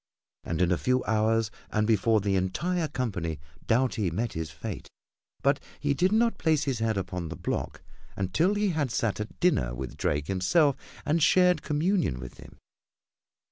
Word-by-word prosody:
And 85 +2 0
in 90 - +2
a 90 - +1
few 125 0 +1
hours 110 0 +1 0.2
and 110 0 +1
before 110 0 +3
the 100 -1 0
entire 155 - 0
company 90 - -3 0.3
Doughty 115 -5 +2
met 110 +8 -2
his 80 -1 -4
fate, - - -7 0.5
but 140 +1 +3 0.2
he 145 -1 +1
did 180 +6 +2
not 230 +2 +2
place 155 -3 +2
his 135 -5 -1
head 110 -2 0
upon 90 -3 -3
the - - -5
block - - -4 0.3
until 155 - +1
he 205 0 +1
had 155 -6 0
sat 115 -3 -1
at 105 0 -6
dinner 60 - +2
with 65 -1 -6
Drake 75 0 0
himself 110 - +2 0.3
and 160 +3 +1
shared 180 +3 +4
communion 155 - 0
with 60 -1 -9
him. - - -13
115 Hz, 170 wpm, -28 LUFS, 95-155 Hz, 0.5 s, shared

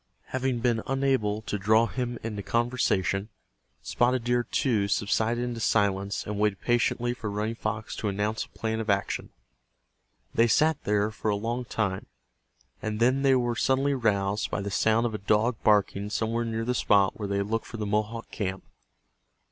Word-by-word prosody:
Having 130 -2 -1
been 120 -2 +1
unable 130 -6 0
to 105 - -3
draw 110 +4 +4
him 120 0 -3
into 105 -2 -4
conversation, 110 -4 0 0.5
Spotted 125 0 +1
Deer, 120 0 +2
too, 115 -3 +1
subsided 110 +4 +1
into 120 -1 -3
silence 100 -3 +1
and 105 0 -4
waited 105 -2 +1
patiently 120 0 +1
for 110 -4 -5
Running 105 +2 -2
Fox 110 -1 -4
to 105 - -2
announce 105 +2 -1
a - - -25
plan 110 0 -1
of 110 -1 -4
action. 100 -1 0 1.0
They 115 - +4
sat 155 +5 +2
there 105 +1 +1
for 110 0 -3
a 105 - +2
long 120 +4 -3
time, 100 -5 -2 0.7
and 110 0 -3
then 130 +3 +3
they 135 -1 +4
were 120 -2 +1
suddenly 135 +3 +2
roused 105 -4 0
by - - -2
the 100 0 -4
sound 110 +4 +2
of 115 - -1
a 105 - -3
dog 110 +3 +2
barking 105 -1 +2
somewhere 115 +2 -1
near 115 0 -2
the 125 - 0
spot 100 -5 +3
where 105 - -3
they 100 0 -1
had 100 +2 -2
looked 115 0 -1
for 115 - -7
the 105 - -3
Mohawk 105 +3 -2
camp. 95 -2 -3
110 Hz, 180 wpm, -27 LUFS, 105-120 Hz, 1.0 s, draw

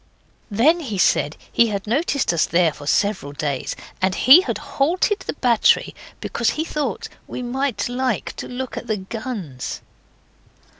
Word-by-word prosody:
Then 265 +12 +3
he 235 -11 -4
said 155 -4 +2
he 235 - +4
had 200 -2 -3
noticed 275 - 0
us 165 - +2
there 170 -3 +2
for 145 -1 -11
several 190 -6 0
days, 140 -2 -3 0.3
and 190 0 +1
he 280 +8 +8
had 380 - -3
halted 360 +8 0
the - - -5
battery 240 -6 +3 0.3
because - - -1
he 315 - 0
thought 330 +10 -3 0.2
we 250 - -5
might 260 +1 -1
like 250 +1 -2
to - - -6
look 255 0 -5
at - - -6
the 215 - 0
guns. 195 - -6
235 Hz, 155 wpm, -21 LUFS, 190-275 Hz, 0.3 s, he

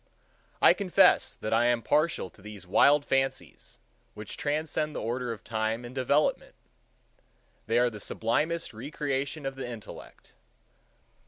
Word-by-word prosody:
I - - +8
confess 190 -1 +3
that 110 - -4
I 115 +2 +3
am 120 -1 +2
partial 150 - +1
to - - -21
these 105 -2 -10
wild 140 +10 +4
fancies, 135 0 -2 0.4
which 105 0 -7
transcend 150 +1 -2
the - - -2
order 120 +1 -3
of 115 - -8
time 110 +1 -2
and 120 - -9
development. 135 +3 0 1.1
They 115 +2 +1
are 125 0 +3
the 105 - -9
sublimest 155 +11 -1
recreation 140 +3 -4
of 135 - -2
the 130 -2 -6
intellect. 115 -3 -11
125 Hz, 140 wpm, -28 LUFS, 115-150 Hz, 1.1 s, I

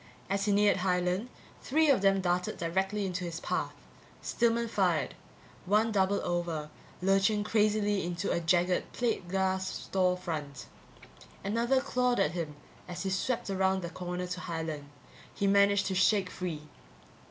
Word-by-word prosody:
As 200 0 +1
he 210 - +2
neared 205 0 +4
Highland, 180 +4 0 0.3
three 315 +3 +2
of 255 - +3
them 195 -1 +3
darted 180 0 0
directly 190 +4 -1
into 180 -1 -3
his 170 -1 -4
path. - - -2 0.5
Stillman 235 0 +1
fired. 180 - +1 0.5
One 215 +3 +3
doubled 200 -1 +2
over, 170 -3 -2 0.3
lurching 195 +2 +3
crazily 210 -1 +2
into 175 -1 -2
a - - +1
jagged 175 +2 +1
plate 230 -7 -1
glass 190 0 0
store 185 -1 0
front. 150 -7 -5 0.8
Another 235 +6 +2
clawed 250 -1 +1
at 150 - +2
him 165 -4 -4 0.3
as 180 +1 -5
he 190 - -1
swept 205 +2 -1
around 190 -1 +1
the 170 - -5
corner 180 0 -4
to 180 0 -5
Highland. 160 -4 -4 0.5
He 200 - -1
managed 200 0 +4
to 190 - -1
shake 185 0 +3
free. 165 -5 -4
190 Hz, 150 wpm, -30 LUFS, 175-205 Hz, 0.8 s, neared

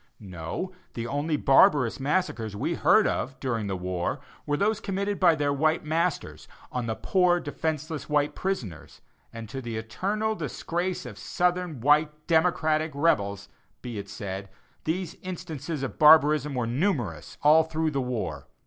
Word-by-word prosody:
No, 90 - -5 0.2
the 115 - -3
only 145 +4 -1
barbarous 135 -3 +4
massacres 135 - -1
we - - -1
heard - - +4
of, 135 +1 -2
during 115 -5 -2
the 95 -1 -2
war, 90 -1 -2 0.3
were 145 0 +1
those 210 +3 +1
committed 200 0 -2
by 175 -4 +5
their 145 -2 0
white 155 +3 +1
masters 160 +2 -1 0.2
on 125 -2 -3
their 110 - -1
poor, 180 - +2
defenceless 155 -1 -4
white 150 0 +2
prisoners, 120 - -4 0.3
and 115 -1 -8
to 130 +5 -6
the 115 -3 -5
eternal 200 - -2
disgrace 175 0 -3
of 110 -6 -9
southern 180 -6 -1
white 150 +2 +2
"democratic" 160 -2 +2
rebels, 100 -10 +1 0.4
be 120 -4 -5
it 100 - -8
said, 95 -1 -6 0.4
these 170 +1 -2
instances 160 -5 -5
of 135 - -5
barbarism 150 -2 +6
were 125 -2 0
numerous 120 - -2
all 155 +2 +7
through 160 0 -1
the 140 -2 -1
war. 125 -3 -4
150 Hz, 150 wpm, -27 LUFS, 115-165 Hz, 0.4 s, all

